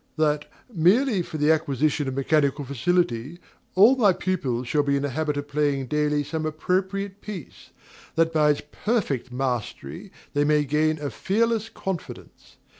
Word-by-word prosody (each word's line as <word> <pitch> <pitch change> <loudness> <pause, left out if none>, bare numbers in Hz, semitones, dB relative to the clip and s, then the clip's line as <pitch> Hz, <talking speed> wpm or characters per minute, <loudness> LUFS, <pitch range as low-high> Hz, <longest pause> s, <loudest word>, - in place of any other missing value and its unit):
that, 150 -1 +1 0.2
merely 200 - +3
for 160 - -6
the 150 +1 +3
acquisition 150 -1 +1
of 130 - -3
mechanical 140 0 +1
facility, 140 0 0 0.4
all 215 +8 +7
my 215 -7 +5
pupils 135 -11 -2
shall 150 +2 +2
be 140 -1 +1
in 140 - -1
the 145 - -1
habit 150 +1 -1
of 145 0 -4
playing 145 -2 0
daily 150 +2 +1
some 160 +2 -4
appropriate 190 +5 -2
piece, 195 -8 -9 0.5
that 165 0 +2
by 150 -1 +4
its 145 - +1
perfect 170 - -1
mastery 125 - -4 0.2
they 145 - +2
may 150 0 +3
gain 155 +2 +1
a 145 -2 -4
fearless 225 +2 0
confidence. 190 -4 -7
150 Hz, 155 wpm, -25 LUFS, 140-180 Hz, 0.5 s, all